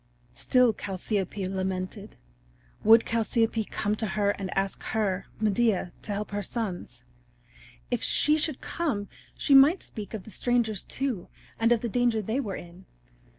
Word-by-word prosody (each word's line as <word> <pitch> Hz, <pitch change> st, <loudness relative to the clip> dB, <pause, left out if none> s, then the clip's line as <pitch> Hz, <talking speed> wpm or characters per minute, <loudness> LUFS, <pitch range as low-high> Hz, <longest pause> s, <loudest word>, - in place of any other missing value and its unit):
Still 250 Hz, -, +3 dB
Chalciope 195 Hz, 0 st, -3 dB
lamented. 190 Hz, +2 st, -4 dB, 0.7 s
Would 225 Hz, +1 st, +7 dB
Chalciope 225 Hz, -1 st, 0 dB
come 205 Hz, 0 st, -1 dB
to 220 Hz, -, -1 dB
her 205 Hz, 0 st, +1 dB
and 195 Hz, -2 st, -5 dB
ask 195 Hz, 0 st, -1 dB
her, 200 Hz, -4 st, -1 dB
Medea, 215 Hz, -3 st, +1 dB
to -, -, -5 dB
help 205 Hz, +1 st, -3 dB
her 205 Hz, 0 st, -2 dB
sons? 200 Hz, -, -4 dB, 0.9 s
If -, -, 0 dB
she 300 Hz, -, +3 dB
should 310 Hz, -2 st, -1 dB
come 255 Hz, -12 st, -2 dB, 0.3 s
she 285 Hz, -, +2 dB
might 280 Hz, +7 st, +7 dB
speak 215 Hz, 0 st, -7 dB
of 205 Hz, -, -6 dB
the 220 Hz, -, -12 dB
strangers, 230 Hz, -3 st, 0 dB
too, 260 Hz, -9 st, -3 dB, 0.3 s
and 230 Hz, +1 st, +3 dB
of 235 Hz, -2 st, +4 dB
the 240 Hz, -, -1 dB
danger 240 Hz, 0 st, +1 dB
they 220 Hz, +5 st, -1 dB
were 210 Hz, -8 st, -3 dB
in. 175 Hz, +2 st, -11 dB
215 Hz, 150 wpm, -27 LUFS, 195-240 Hz, 0.9 s, Would